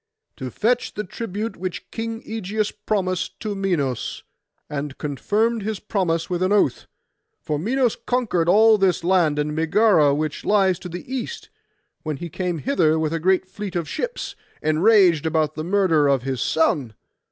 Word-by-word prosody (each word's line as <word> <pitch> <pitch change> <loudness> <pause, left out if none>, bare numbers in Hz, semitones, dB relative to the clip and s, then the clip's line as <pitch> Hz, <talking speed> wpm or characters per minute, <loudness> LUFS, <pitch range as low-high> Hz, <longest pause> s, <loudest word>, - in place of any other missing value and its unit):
'To 130 - -5
fetch 240 - 0
the 210 - -2
tribute 215 +2 -5
which 185 0 -6
King 225 0 -4
Ægeus 215 -1 -2
promised 185 -4 -1
to 215 -2 -3
Minos, 170 - -2 0.4
and 145 -2 -5
confirmed 210 - 0
his 210 -1 -3
promise 180 -6 -1
with 180 -1 -2
an 185 +1 +1
oath. 205 -11 +2 0.5
For 150 -1 -3
Minos 245 - +1
conquered 215 -10 +1
all 215 +3 +6
this 185 -3 +2
land, 170 -4 +3
and 150 0 -1
Megara 160 -3 +4
which 155 0 -3
lies 190 -3 +3
to 180 - -8
the 175 +1 -7
east, 435 - -5 0.5
when 155 -2 -4
he 170 +4 -6
came 180 +1 -2
hither 160 - +2
with 160 0 -1
a 165 - -1
great 185 +3 +2
fleet 195 0 -7
of 170 -3 -1
ships, 485 - -4 0.3
enraged 170 0 +4
about 155 -1 +1
the 155 - -5
murder 175 -5 +3
of 135 -3 +2
his 130 -3 -2
son. 135 -8 +1
180 Hz, 165 wpm, -22 LUFS, 155-210 Hz, 0.5 s, all